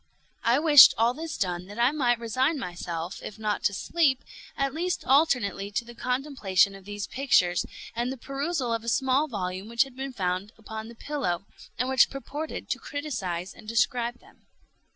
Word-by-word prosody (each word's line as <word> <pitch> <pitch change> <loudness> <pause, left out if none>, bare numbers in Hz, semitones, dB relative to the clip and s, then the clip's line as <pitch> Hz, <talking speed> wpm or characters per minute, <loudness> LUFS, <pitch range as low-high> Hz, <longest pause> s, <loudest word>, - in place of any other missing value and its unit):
I 235 +2 +4
wished 295 -2 +9
all 230 +2 +3
this 320 +4 -5
done 180 -1 -2
that 205 +2 -10
I 240 +3 +4
might 250 -5 +2
resign 255 +7 0
myself, 175 -5 -5
if 215 - -8
not 215 -1 -1
to 200 - +3
sleep, 280 - +1 0.3
at 275 -1 0
least 345 +2 -2
alternately 250 -9 +2
to 220 +3 -2
the 240 - -11
contemplation 245 - +1
of 195 -1 -13
these 205 -1 -5
pictures, 185 -9 +2 0.3
and 240 +2 -1
the 265 - -5
perusal 275 0 -2
of 225 -1 -2
a 235 - -2
small 265 +4 +2
volume 190 -4 -4
which 235 +2 +3
had 270 -2 -14
been 270 +1 -5
found 190 -1 -2
upon 220 0 -7
the 235 - -11
pillow, 210 -10 -3 0.3
and 250 - 0
which 265 0 +5
purported 290 +3 -6
to - - -1
criticise 190 - -4
and 215 - -15
describe 235 +2 0
them. - - -23
235 Hz, 180 wpm, -27 LUFS, 200-275 Hz, 0.3 s, wished